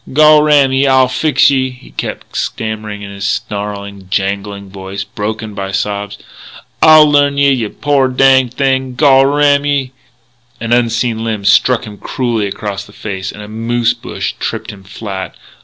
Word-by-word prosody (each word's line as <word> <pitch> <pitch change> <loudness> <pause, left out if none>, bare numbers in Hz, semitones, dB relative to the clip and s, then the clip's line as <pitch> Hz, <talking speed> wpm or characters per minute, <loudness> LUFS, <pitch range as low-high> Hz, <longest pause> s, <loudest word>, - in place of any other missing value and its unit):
"Gol 155 +1 +6
ram 145 -3 +4
ye, 135 +1 +2
I'll 130 -1 +4
fix 140 +2 +2
ye!" 130 -1 +1
he 125 -1 -15
kept - - -6
stammering 110 -2 -4
in 100 - -8
his 100 0 -4
snarling, 100 -1 -4
jangling 100 0 -3
voice, 95 0 -6
broken 110 +2 -5
by 100 -1 -5
sobs. 100 +1 -3 0.6
"I'll 155 -1 +8
learn 145 -1 +2
ye, 140 0 +4
yeh 120 -5 -1
poor 140 -3 +2
danged 130 -1 +3
thing, 130 -2 0
gol 135 -1 +5
ram 145 0 +3
ye 140 -3 -1 0.4
" 120 0 -38
An 115 +1 -1
unseen 115 -1 0
limb 110 -3 -3
struck 125 +4 +3
him 105 -1 -11
cruelly 115 -5 -2
across 100 0 -5
the 100 - -17
face, 95 -3 -5
and 105 - -10
a - - -9
moose 115 +2 0
bush - - -5
tripped - - -4
him 100 -2 -14
flat. 95 -2 -7
115 Hz, 170 wpm, -14 LUFS, 100-135 Hz, 0.6 s, I'll